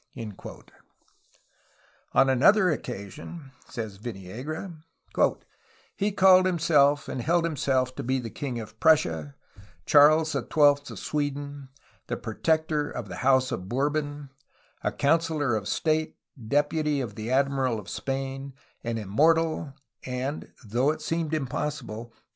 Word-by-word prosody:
*' - - -37 2.1
On 135 - +6
another 180 - +5
occasion, 140 - -7 0.2
says 110 -6 -6
Viniegra: 120 - -6 1.2
"He 205 +1 0
called 185 -1 +6
himself 150 -4 +3
and 130 -1 -4
held 170 +6 +2
himself 130 -5 0
to - - -5
be 130 +2 0
the 115 -4 -5
king 130 -5 -4
of 110 0 -10
Prussia, 80 - +2 0.5
Charles 155 +2 +6
XII 140 - 0 0.5
of - - -8
Sweden, 145 -1 -3 0.4
the - - -2
Protector 155 -2 0
of 115 -5 -6
the - - -6
House 130 0 +3
of 95 -5 -4
Bourbon, 145 +2 -2 0.5
a - - +1
councillor 150 -3 +1
of 105 -2 -3
state, 155 -1 0 0.3
deputy 145 +2 +1
of 120 -6 -4
the 110 +3 -6
Admiral 135 -2 +1
of 105 - -11
Spain, 135 0 -4 0.3
an 115 -1 -2
immortal, 155 +9 +2 0.3
and, 130 +3 -4
[though 120 +6 +1
it 155 - -2
seem] 165 -2 -1
impossible. 135 -5 -3
140 Hz, 125 wpm, -27 LUFS, 125-155 Hz, 2.1 s, On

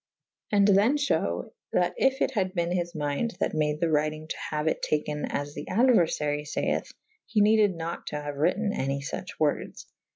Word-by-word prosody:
And 200 -1 +4
then 205 +8 +4
fhew 290 -1 -1 0.2
that - - +2
yf 270 -5 +2
it - - +2
had 190 -4 -1
ben 170 0 0
his 175 -1 -2
minde 150 +10 -1
that - - 0
made 150 -1 0
the 170 - +2
writyng 155 0 0
to - - -2
haue 150 0 -2
it 160 - 0
taken 150 0 -1
as 145 0 -3
the - - -6
aduerfarye 160 - +2
fay - - 0
eth: - - -2 0.4
he 215 - +1
neded 210 -2 +4
nat 165 +1 -5
to 150 - -3
haue 145 0 -5
wryte« 180 +9 +1
any 135 +1 -1
fuch 145 +6 -5
wordes. 150 -2 -1
165 Hz, 190 wpm, -27 LUFS, 150-205 Hz, 0.4 s, And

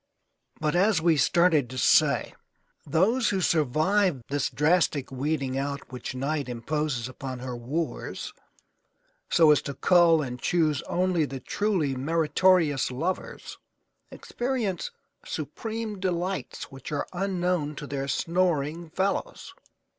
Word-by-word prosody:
But, 155 +1 0
as 195 +1 +3
we 165 0 +3
started 155 -1 +3
to 130 - -7
say, - - +3 0.5
those 210 - +2
who 195 - 0
survive 160 - +2
this 145 0 0
drastic 150 -3 +1
weeding 135 -1 -1
out 140 -2 -4
which 125 0 -6
Night 140 +1 -2
imposes 125 0 -2
upon 130 0 -6
her 125 0 -5
wooers 140 +8 -4 1.0
so 160 -3 +6
as 145 - +4
to 140 - -6
cull 170 -3 +4
and 125 -2 -6
choose 155 -5 +1
only 180 -3 +1
the 135 -2 -6
truly 180 -6 -1
meritorious 160 +1 +2
lovers 165 +9 -4 0.5
experience 240 - -3 0.3
supreme 225 -3 -5
delights 185 0 -3
which 135 +1 -9
are 145 - -1
unknown 180 -5 -1
to 145 - -6
their 140 -1 -4
snoring 165 +1 0
fellows. 195 - -2
155 Hz, 120 wpm, -27 LUFS, 140-180 Hz, 1.0 s, so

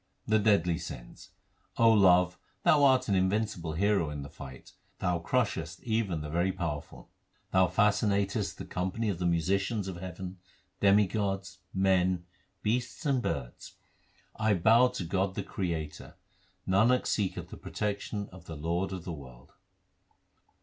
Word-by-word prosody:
The 110 0 +3
deadly 90 -6 +3
sins: 65 -8 -9 0.5
love, 90 -6 +5 0.2
thou 145 -2 +5
art 130 -1 +4
an 100 - +1
invincible 95 -3 0
hero 100 -2 +2
in 75 -1 -5
the 70 - -10
fight; 65 -3 -11 0.3
thou 90 -1 0
crustiest 80 - -1
even 110 -8 -1
the 75 - -6
very 85 +3 +1
powerful. 80 -6 -5 0.4
Thou 95 -1 +4
fascinatest 100 -2 +1
the - - -7
company 95 +5 -2
of 90 -4 -2
the 90 - +1
musicians 95 +5 0
of 95 -2 -5
heaven, 90 +1 -7 0.4
demigods, 100 -1 +2
men, 95 -2 +2 0.4
beasts, 125 +8 -1
and 135 -3 +2
birds. 65 - -4 0.6
1 110 - -1
1 90 - -1
bow 115 +3 +7
to 125 -7 -4
God 95 +2 -1
the - - -2
Creator; 80 -5 -4 0.5
Nanak 110 +7 +3
seeketh 100 -4 -1
the - - -8
protection 105 0 -3
of 90 -2 -13
the 80 - -7
Lord 85 +5 -1
of 95 -3 -5
the 90 - -4
world. 65 -3 -12
95 Hz, 145 wpm, -30 LUFS, 85-105 Hz, 0.6 s, bow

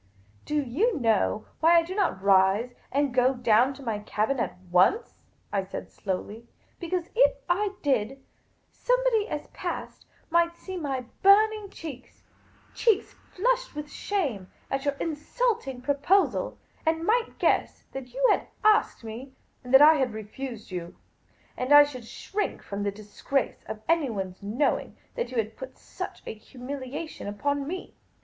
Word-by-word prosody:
" 100 0 -31
Do 300 - -2
you 295 - 0
know 220 -2 +1
why 330 +2 +6
I 335 - +5
do 350 +3 -6
not 370 - 0
rise 200 +5 +4 0.2
and 280 -1 +1
go 255 +1 +3
down 245 +1 +4
to 275 - -12
my 225 -4 -2
cabin 215 +5 -1
at 230 - -2
once? 185 - +3 0.2
" - - -28
I 195 -1 +1
said, 190 - -7
slowly. 205 +4 -5 0.2
" - - -37
Because, 350 0 -3
if - - +5
I 390 +3 0
did, 270 -2 0 0.5
somebody - - +1
as - - -3
I - - -23
passed - - -5 0.2
might 340 0 +3
see 375 - -7
my 280 -7 -2 0.2
burning 420 +1 +5
cheeks 290 -9 -10 0.2
— - - -31
cheeks 450 -4 +2
flushed - - -1
with 300 0 -6
shame 275 - -2 0.2
at 270 +1 -1
your 285 0 +1
insulting 310 - -2
proposal 290 +9 +2
— - - -33
and 325 +1 +1
might 460 +3 +1
guess - - +1
that 260 -2 -7
you 265 +2 +2
had - - +1 0.2
as^ed 430 - +4
me, 235 +5 -8 0.3
and 250 - -8
that 270 +2 +9
I 310 +1 +9
had 260 -5 0
refused 220 +1 -7
you. 175 -2 -6 0.6
And 255 +2 -3
I 290 0 +10
should 255 -5 -7
shrink 415 - -4
from 200 0 -5
the 205 0 0
disgrace 215 +6 -3
of 215 0 -7
anyone's 225 - 0
knowing 225 +9 -1 0.2
that 480 - -3
you 255 - -5
had 220 0 -1
put 260 0 -9
such - - -8
a - - -4
humiliation 260 +6 -7
upon 280 +7 -1
me. 365 +3 -6
275 Hz, 165 wpm, -27 LUFS, 225-345 Hz, 0.6 s, I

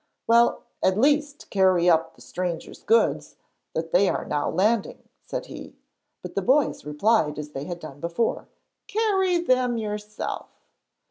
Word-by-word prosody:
'Well, 235 +1 +4 0.2
at 190 +1 +2
least 290 +3 +1
carry 185 -3 +3
up 165 -1 +3
the - - -19
strangers' 175 -2 -5
goods; 455 +1 +1 0.4
they 170 +4 +2
are - - -2
now 145 - -1
landing,' 210 +5 0
said - - -5
he, - - -10 0.5
but - - -7
the - - -1
boys 280 +3 +2
replied 150 +1 +1
as 150 0 -6
they 140 0 -5
had 175 0 -5
done 150 -4 -10
before, 170 +9 -2 0.4
'Carry 390 -4 +1
them 255 -7 +1
yourself.' 210 -1 -5
210 Hz, 140 wpm, -25 LUFS, 165-255 Hz, 0.5 s, Well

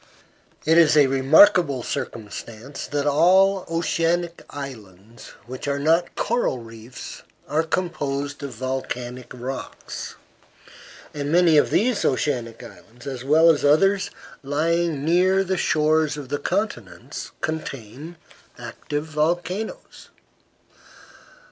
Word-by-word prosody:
It 160 +2 +5
is 155 -2 +5
a 145 - +7
remarkable 135 +1 +5
circumstance 115 +5 -6
that 145 -1 -2
all 185 +7 +4
the 180 - -13
oceanic 170 +1 0
islands 115 -6 -10
which 130 +3 -7
are 140 0 0
not 165 +4 +1
coral 235 - 0
reefs 115 +1 -10 0.3
are 155 +2 +1
composed 145 -5 -3
of 140 -4 -6
volcanic 125 0 -5
rocks; 125 +2 -7 1.0
and 145 0 -3
many 170 -1 +5
of 145 - +4
these 240 0 +1
oceanic 125 -4 -1
islands, 120 +2 -14
as 130 -3 -5
well 160 +4 +6
as 150 - -1
others 190 +7 +3 0.3
lying 155 +1 0
near 185 +3 +3
the 190 0 -1
shores 155 -2 +1
of 140 -3 -8
the 145 +1 -2
continents, 180 - -4
contain 150 0 -5 0.4
active 150 +1 -5
volcanoes. 175 - -3
150 Hz, 110 wpm, -23 LUFS, 130-170 Hz, 1.0 s, a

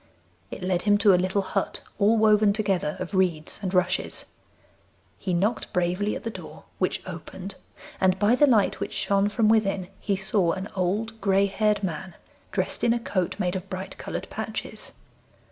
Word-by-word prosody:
It - - -7
led 180 -1 +1
him 205 +1 +4
to 205 -1 +5
a 180 0 +3
little 190 +2 0
hut - - -2 0.2
all 215 +2 +4
woven 215 -1 +5
together 200 -2 0
of 185 +2 -5
reeds 175 -5 0
and 190 -3 -2
rushes. 180 0 0 0.9
He 185 - -3
knocked 205 +6 0
bravely 180 +4 0
at - - -6
the 230 - -3
door, - - -10 0.2
which - - 0
opened, 190 +1 -7 0.5
and 190 -1 +3
by 205 +4 +3
the 290 +4 +5
light 220 -6 +3
which - - -4
shone 200 +1 +1
from 215 +1 +2
within 195 -4 +2
he 200 - 0
saw 190 -2 +1
an 190 +2 -5
old 210 +5 -1
gray 195 0 +3
haired 210 +1 +1
man 180 0 -4 0.4
dressed - - -1
in 235 - +4
a 240 - 0
coat 185 -6 -1
made 180 0 -1
of 190 +1 -5
bright 190 +1 -5
coloured - - -5
patches. - - -4
195 Hz, 180 wpm, -26 LUFS, 185-210 Hz, 0.9 s, to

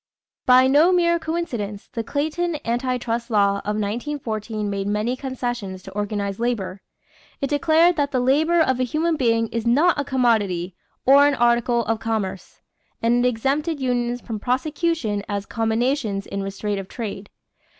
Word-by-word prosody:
= - - -71
By 255 0 +7
no 295 +7 +5
mere 340 -1 +3
coincidence, 245 -12 -4
the 230 - -2
Clayton 315 +6 -1
Anti 250 +2 0
trust 235 -1 -3
law 200 -2 +2
of 210 +1 -3
1914 215 -1 -3
made 200 -1 -2
many 210 +4 0
concessions 245 -8 -4
to - - -10
organized 205 -1 -3
labor. 210 -5 -2 0.6
It 275 - -2
declared 325 +4 +4
that 285 -1 +1
"the 260 -3 0
labor 305 +7 +3
of 260 -5 +2
a - - +2
human 320 +6 0
being 230 -5 +1
is 230 0 -3
not 300 +7 +3
a - - +1
commodity 220 -10 +1 0.3
or 280 +2 +7
an 290 - +2
article 235 -1 +2
of 225 0 -1
commerce," 210 -5 -4 0.4
and 240 +1 +2
it 250 - +4
exempted 285 +7 -1
unions 245 -2 -1
from 225 -3 -5
prosecution 260 - -1
as 200 -1 -2
"combinations 225 -2 -1
in 200 - -4
restraint 195 +1 -3
of 195 - -7
trade." 205 -3 -6
240 Hz, 160 wpm, -22 LUFS, 210-280 Hz, 0.6 s, By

